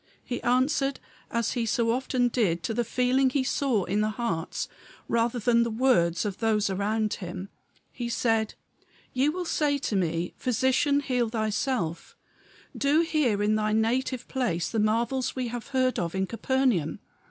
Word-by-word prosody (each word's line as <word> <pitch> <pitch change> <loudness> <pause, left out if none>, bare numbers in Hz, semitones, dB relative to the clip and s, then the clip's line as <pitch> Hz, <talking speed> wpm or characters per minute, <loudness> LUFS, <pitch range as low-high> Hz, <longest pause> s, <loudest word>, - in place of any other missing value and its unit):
He 245 - -4
answered 270 +2 +1 0.3
as 235 -1 0
he 240 - -1
so 230 +1 +2
often 250 0 +1
did 185 -9 0
to 225 - -1
the 240 - +1
feeling 250 +3 +2
he 260 +1 0
saw 260 -6 +1
in 205 +4 0
the 215 - +1
hearts 215 -8 -3 0.4
rather 235 +1 +1
than 235 +1 +3
the 235 - +1
words 215 -8 +2
of 200 -2 -3
those 215 -3 +1
around 210 +2 0
him. 185 +1 -6 0.4
He 240 -2 -4
said, 225 -2 +1 0.6
"Ye 265 +3 +2
will 360 +3 -3
say 295 -3 +1
to 255 -6 -2
me, 170 -2 -1
Physician, 260 +4 +2
heal 250 -4 0
thyself. 220 - -2 0.6
Do 290 +3 +3
here 290 -11 +1
in 210 +1 +2
thy 215 0 +1
native 245 +3 0
place 220 -11 -1
the 225 - 0
marvels 235 +5 +1
we 255 -2 -2
have 240 0 -6
heard 260 -2 +1
of 170 0 -2
in 190 0 +1
Capernaum. 230 - 0
235 Hz, 165 wpm, -27 LUFS, 210-260 Hz, 0.6 s, than